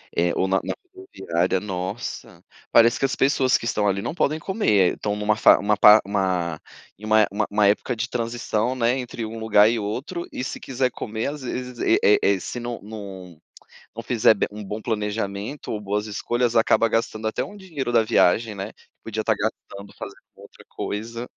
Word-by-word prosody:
eh, 85 +1 +2
ou 95 - +1
na 95 0 +2
na - - -3 0.2
rodoviária. 95 - -2
Nossa, 95 -2 -6 0.3
parece 115 +1 +5
que - - +2
as 135 - -1
pessoas 135 -1 +3
que - - -8
estão 105 -2 0
ali 100 0 +1
não 100 - -4
podem 155 -3 0
comer, 110 - +2
estão 105 -1 -3
numa 105 +1 +1
fa 110 - +6
uma 105 +1 +1
pa 105 +1 +8
uma 95 -5 -1 0.4
em 105 - -9
uma 110 0 +5
uma 100 - -1
uma 105 0 +3
época 105 +4 +1
de 115 +1 -3
transição, 120 0 -2
né, 120 0 +1
entre 120 -2 -5
um 115 +1 -7
lugar 105 -2 +5
e 115 +1 +1
outro. 130 - -4
E - - -4
se - - -5
quiser 130 -1 -1
comer 110 0 -4
às 150 - -9
vezes, 125 -1 -5
eh - - +3
eh 105 - +6
eh, 100 -1 +2
se 120 - -6
não 120 0 -5
não 105 - -12 0.4
não 80 -1 -20 0.5
não 115 - -6
fizer 115 -1 +4
be 100 - -1
um 105 +1 -8
bom 105 +3 -5
planejamento 105 +3 -3
ou 105 - -3
boas 105 +1 -2
escolhas, 120 +3 -1
acaba 115 0 +3
gastando 110 -1 -1
até 110 - -2
um 205 - -10
dinheiro 160 -11 -5
da 115 -1 +5
viagem, 110 0 +2
né. 100 +1 -6 0.3
Podia 110 -1 -4
estar 110 - +2
gastando, 100 -2 -5
fazendo - - -9
outra - - -16
coisa. 115 +3 -5
110 Hz, 200 wpm, -23 LUFS, 105-120 Hz, 0.5 s, pa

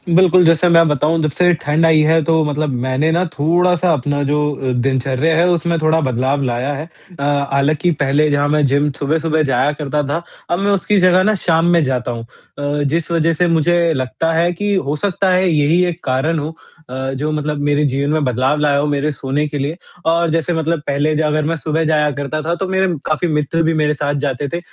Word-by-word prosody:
बिल्कुल, 185 -1 +5
जैसे 165 +2 +3
मैं 165 -1 +5
बताऊँ 150 +3 +1
जब 155 - +1
से 180 +4 +2
ठंड 150 +3 +1
आई 160 -1 +4
है 165 0 +3
तो 160 0 +2
मतलब 150 +1 -2 0.2
मैंने 135 +5 0
ना 175 +3 +1
थोड़ा-सा 175 +3 +1
अपना 145 +1 -1
जो 145 +2 0 0.2
अ, 130 -1 -3
दिनचर्या 135 +4 0
है 170 +2 +3
उसमें 170 -1 0
थोड़ा 155 +1 +2
बदलाव 130 +2 -1
लाया 125 +3 -2
है। 150 +3 -6 0.3
अ, 140 - -3 0.3
हालाँकि 145 +5 +1
पहले 145 +3 +2
जहाँ 145 0 +1
मैं 150 -1 +2
जिम 145 +2 +1
सुबह-सुबह 155 +2 0
जाया 135 +3 +2
करता 150 0 -2
था, 165 +4 -2 0.3
अब 175 - 0
मैं 200 +1 +1
उसकी 200 +1 +1
जगह 185 0 +4
ना 215 +1 +2
शाम 165 -1 +2
में 170 - +4
जाता 125 -2 -2
हूँ। 115 -1 -6
अ, 145 +4 -5
जिस 160 +4 -2
वजह 165 0 +1
से 175 +3 +1
मुझे 170 0 +2
लगता 130 +5 -2
है 170 +2 +1
कि 205 +3 -2
हो 145 -5 -1
सकता 190 +3 -1
है 185 +1 +2
यही 155 +3 +2
एक 175 0 -8
कारण 140 +5 0
हो 150 +2 -5 0.4
अ, 130 - -9 0.2
जो 150 +3 -3
मतलब 150 0 -2
मेरे 145 0 +1
जीवन 140 +1 -1
में 155 -1 0
बदलाव 130 +3 0
लाया 145 -1 +2
हो 145 - +1
मेरे 145 +1 -1
सोने 140 +1 -2
के 145 0 -5
लिए 145 +5 -3 0.3
और 165 0 +2
जैसे 165 +2 -1
मतलब 160 0 -1
पहले 145 +2 0
अगर 150 0 0
मैं 165 - -1
सुबह 160 +1 -2
जाया 150 -1 +2
करता 145 +2 -4
था 165 +3 -2
तो 190 +2 -4
मेरे 190 0 +1 0.2
काफ़ी 155 +3 -1
मित्र 150 +2 0
भी 165 0 +1
मेरे 150 -1 +1
साथ 145 0 -2
जाते 140 +1 -2
थे। 170 - -1
155 Hz, 220 wpm, -17 LUFS, 145-165 Hz, 0.4 s, बिल्कुल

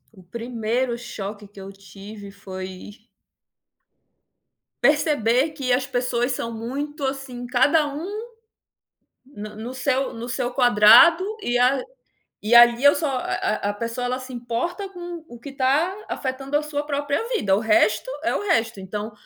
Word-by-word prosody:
O 190 - -15
primeiro 235 +4 -2
choque 205 -3 -7
que 200 0 -15
eu 195 0 -8
tive, 200 +1 -11
foi 190 0 -9 1.9
perceber 285 -1 +2
que 270 -4 -3
as 255 +1 +1
pessoas 245 -1 -1
são 230 -1 -4
muito, 275 +6 -5
assim, 265 -2 -5
cada 290 +5 +3
um 290 +3 -5 1.2
na 215 -6 -9
no 225 +4 -7
seu 265 0 -1
no 230 +1 -7
seu 245 0 -2
quadrado, 245 - +6 0.2
e 245 -11 -1
a 255 +2 +3 0.6
e 215 +3 +2
ali 240 +2 +7
eu 285 - +7
só 300 -1 -1
a 250 - -2
a 205 - -1
a - - -1
pessoa, 230 +4 -4
ela 250 +1 -1
se 255 0 -9
importa 245 - -3
com 350 -3 -8
o 240 -4 -13
que 260 - -9
está 280 +7 +1
afetando 270 +1 -2
a - - -3
sua 295 -1 -3
própria 285 +6 -2
vida, 195 - +2
o - - 0
resto, 215 +1 +2
é 335 - 0
o - - -2
resto. 230 - 0
Então, 210 +3 -5
245 Hz, 155 wpm, -23 LUFS, 220-280 Hz, 1.9 s, ali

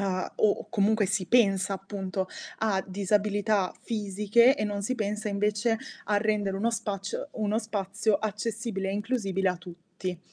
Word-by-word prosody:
uhm, 185 -2 -1
o 210 - +2
comunque 210 -1 +3
si 195 -2 -1
pensa, 195 -4 +4
appunto, 190 -1 -3 0.3
a 200 -4 +1
disabilità 205 0 +1
fisiche 215 +4 +3
e 215 - -1
non 205 -1 -2
si 255 +6 -1
pensa 210 0 -2
invece 210 +3 +1 0.3
a 210 - +2
rendere 205 -2 +1
uno 230 +4 +1
spaci 200 -3 -3 0.2
uno 215 0 0
spazio 205 0 0
accessibile 215 -1 -3
e - - -1
inclusibile 200 -3 0
a 180 - 0
tutti. 180 0 -7
205 Hz, 145 wpm, -28 LUFS, 195-215 Hz, 0.3 s, pensa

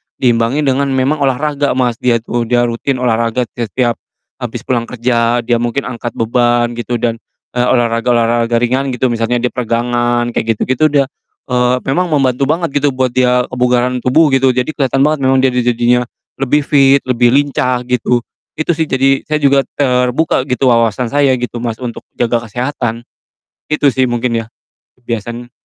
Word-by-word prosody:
diimbangi 120 +3 +1
dengan 140 0 +1
memang 135 +3 0
olahraga, 140 +1 0
Mas, 125 -3 0
dia 115 -2 +1
itu, 120 0 -2
dia 120 +1 +2
rutin 120 +3 -1
olahraga 115 +1 +1
te 120 -2 -4
setiap 120 +1 -1 0.4
habis - - -5
pulang 120 -2 -1
kerja, 120 -1 0
dia 120 0 +1
mungkin 120 +4 -1
angkat 120 -1 -6
beban 120 +1 +1
gitu 120 +1 -4
dan, 115 -1 -1 0.3
eee, 125 0 0
olahraga-olahraga 120 -1 +1
ringan 130 +3 +1
gitu 125 0 0
misalnya 115 +1 -1
dia 125 - 0
peregangan, 120 0 -1
kayak 115 -1 -1
gitu-gitu 130 +7 +1
dia. 140 -2 +2 0.5
Eee, 125 0 +2
memang 180 +7 0
membantu 135 -4 +1
banget 160 -1 0
gitu 140 -2 0
buat 130 -1 0
dia 125 0 +2
kebugaran 125 0 +1
tubuh 145 +4 +3
gitu, 135 -1 +3
jadi 125 +4 0
keliatan 135 -2 0
banget 155 0 +1
memang 130 0 +2
dia 130 - +3
di 125 - 0
jadinya 120 +1 +2 0.3
lebih 145 +2 +1
fit, 140 -1 +4
lebih 120 -1 +2
lincah 130 -3 +1
gitu. 125 -1 0 0.3
Itu 155 +2 -1
sih, 160 -1 -1
jadi 135 +1 +2
saya 155 - 0
juga 140 0 +3
terbuka 130 +1 +1
gitu 125 -1 +2
wawasan 115 +1 +1
saya 140 -2 +3
gitu, 120 -1 -4
Mas, 115 -2 -3
untuk 120 0 -7
jaga 120 0 +1
kesehatan. 120 0 -3 0.7
Gitu 150 -1 +1
sih 130 -2 +1
mungkin 120 -1 -1
ya, - - -13 0.5
kebiasaannya. 120 0 -6
125 Hz, 170 wpm, -14 LUFS, 120-135 Hz, 0.7 s, fit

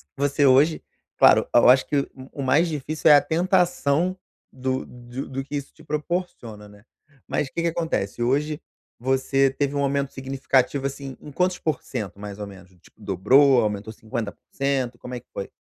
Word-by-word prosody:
você 145 +1 +1
hoje, 140 +4 +4 0.4
claro - - +7
e - - +6
eu 120 - +7
acho 130 +1 +6
que 145 - 0
o 140 - 0 0.2
o 140 - -6
mais 145 +7 +3
difícil 155 0 0
é - - +10
a 145 - +6
tentação 180 -1 +1 0.3
do 130 0 -3
do 120 +2 -8
do 135 0 -4
que 145 +2 -7
isso 140 -1 -5
te 160 - -18
proporciona, 150 - -4
né, 100 0 -18 0.4
mas 140 - -1
que 170 - -3
que 170 - +1
acontece, 160 - -2
hoje 145 +5 0 0.4
você 135 +2 +2
teve 140 +1 -2
um 140 - 0
aumento 140 0 0
significativo, 135 0 0
assim, 140 -1 -5
em 150 - -11
quantos 180 +4 0
porcentos 125 - -4
mais 100 -1 -7
ou 105 - -5
menos? 95 -2 -13
Tipo 100 - -23
dobrou, 125 +8 +4
aumentou 105 0 -2
50% 120 +3 -3
como 125 - -7
é - - -5
que 120 - -28
foi? 100 - -5
135 Hz, 180 wpm, -24 LUFS, 120-150 Hz, 0.4 s, é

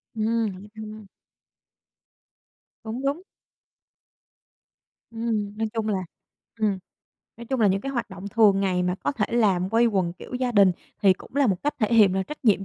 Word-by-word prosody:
Ừm, 225 +1 +1
hỏi 190 +3 -11
thăm. 215 -1 -9 1.8
Cũng 230 +4 -5
đúng. 290 +6 0 1.9
Ừm, 220 -3 -2
nói 220 0 0
chung 220 -1 -2
là 200 -3 0 0.6
ừm, 205 -3 +1 0.6
nói 235 - -9
chung 265 -2 -1
là 210 - +5
những 195 0 +2
cái 275 +3 -4
hoạt 235 -4 -3
động 190 +2 -7
thường 205 -2 +4
ngày 185 -2 +1
mà 180 0 0
có 240 - -2
thể 215 -5 0
làm 195 -6 +2
quây 230 +1 +4
quần 190 -6 0
kiểu 215 - -10
gia 250 -1 -1
đình 200 -3 +6 0.3
thì 195 -2 +7
cũng 245 - -12
là 280 -2 +4
một 190 -4 0
cách 295 - 0
thể 215 - +1
hiện 200 -4 +6
là 190 - +1
trách 300 +4 -9
nhiệm 195 -3 +3
215 Hz, 180 wpm, -25 LUFS, 195-230 Hz, 1.9 s, thì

